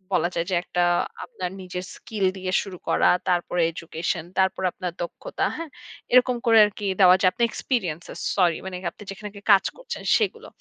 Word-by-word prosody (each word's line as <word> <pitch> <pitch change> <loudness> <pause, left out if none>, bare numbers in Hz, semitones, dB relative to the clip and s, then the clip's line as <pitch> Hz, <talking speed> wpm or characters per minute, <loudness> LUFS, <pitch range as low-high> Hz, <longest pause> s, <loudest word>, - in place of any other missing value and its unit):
বলা 170 +1 +2
যায় 170 0 0
যে - - +2
একটা 180 - -1 0.4
আপনার 190 - -5
নিজের 180 0 -6
স্কিল 210 -4 -3
দিয়ে 185 0 -3
শুরু 190 -3 -8
করা - - +4 0.2
তারপরে 175 0 +1
এডুকেশন, 165 0 -3 0.2
তারপরে 190 0 +1
আপনার 180 -2 -4
দক্ষতা - - -4
হ্যাঁ? 330 -2 -6 0.4
এরকম 250 0 +5
করে 225 -1 +6
আর 210 - -3
কি 205 - -4 0.2
দেওয়া 180 0 +8
যায় 185 -1 +5
আপনার 235 - -1
এক্সপেরিয়েন্সেস। 175 - -3 0.2
সরি 175 -4 +3
মানে 190 -1 -5 0.2
আপনি 210 - -13
যেখানে 210 +2 -7
আগে 200 -1 -12
কাজ 195 - +4
করছেন - - -7
সেগুলো। 430 -3 -2
185 Hz, 180 wpm, -24 LUFS, 175-210 Hz, 0.4 s, দেওয়া